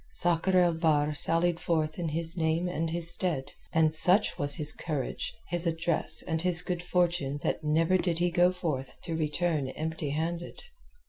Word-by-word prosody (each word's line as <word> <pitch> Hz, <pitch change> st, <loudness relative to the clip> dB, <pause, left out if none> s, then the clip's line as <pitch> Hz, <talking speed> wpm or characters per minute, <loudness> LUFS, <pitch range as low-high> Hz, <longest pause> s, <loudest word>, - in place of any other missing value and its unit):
Sakr 175 Hz, +2 st, +1 dB
el 175 Hz, -1 st, +4 dB
Bahr 155 Hz, -2 st, +2 dB
sallied 165 Hz, +3 st, +1 dB
forth 155 Hz, -1 st, -1 dB
in 170 Hz, -2 st, -1 dB
his 165 Hz, +2 st, -2 dB
name 165 Hz, +1 st, 0 dB
and 165 Hz, -2 st, -2 dB
his 170 Hz, 0 st, +3 dB
stead, 170 Hz, -8 st, -2 dB, 0.2 s
and 160 Hz, -1 st, +3 dB
such 180 Hz, +6 st, +4 dB
was 145 Hz, -1 st, +1 dB
his 150 Hz, -1 st, +2 dB
courage, 150 Hz, -6 st, -4 dB, 0.2 s
his 175 Hz, 0 st, -1 dB
address, 165 Hz, 0 st, 0 dB
and 160 Hz, -2 st, -2 dB
his 180 Hz, -1 st, 0 dB
good 180 Hz, -1 st, -3 dB
fortune 175 Hz, -6 st, 0 dB
that -, -, -1 dB
never 165 Hz, +4 st, +2 dB
did 175 Hz, -3 st, 0 dB
he 175 Hz, +1 st, +1 dB
go 175 Hz, +1 st, +4 dB
forth 150 Hz, -8 st, -4 dB
to 165 Hz, -, -3 dB
return 155 Hz, -1 st, -1 dB
empty 155 Hz, +2 st, -4 dB
handed. 165 Hz, -, -4 dB
165 Hz, 175 wpm, -29 LUFS, 155-175 Hz, 0.2 s, el